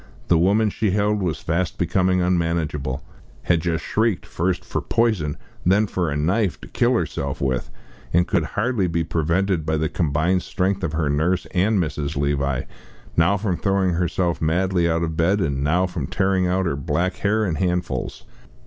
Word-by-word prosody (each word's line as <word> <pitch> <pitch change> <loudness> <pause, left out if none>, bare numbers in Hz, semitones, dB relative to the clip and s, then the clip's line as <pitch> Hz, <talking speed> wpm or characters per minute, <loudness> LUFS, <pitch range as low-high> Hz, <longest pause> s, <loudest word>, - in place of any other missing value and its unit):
The 85 - +5
woman 105 +5 +3
she 110 +1 0
held 105 +1 +1
was 85 -5 -2
fast 85 +2 -1
becoming 90 +1 +2
unmanageable 80 -6 -1 0.4
had 85 -2 +2
just 85 -1 -1
shrieked, 110 -4 0
first 90 +1 -2
for - - -2
"poison," 110 -11 0 0.3
then 100 +4 +4
for 90 -5 -1
a 70 - -1
"knife," 90 +6 +1
to - - -10
kill - - +1
herself 70 -1 -2
with, 65 -2 -1 0.4
and 85 +1 +3
could 90 -6 +1
hardly 110 -3 +1
be 85 -1 0
prevented 85 +2 0
by 80 +1 0
the 80 0 0
combined 85 +3 +1
strength 95 +1 -1
of 85 -2 -1
her 80 -2 0
nurse 85 +5 +1
and 100 +3 +2
Mrs. 75 -4 -2
Levi, 70 -2 0 0.5
now 85 +5 +3
from 95 -3 -1
throwing 95 -2 +1
herself 85 0 0
madly 85 +2 +1
out 85 0 +1
of 80 -1 -2
bed, 90 +5 +2
and 70 -6 -1
now 85 +6 +2
from 90 -7 -4
tearing 95 -1 +1
out 95 +1 +1
her 80 - 0
black 85 +5 -1
hair 110 +2 +1
in 90 - -1
handfuls. 90 +2 -2
85 Hz, 175 wpm, -22 LUFS, 80-95 Hz, 0.5 s, The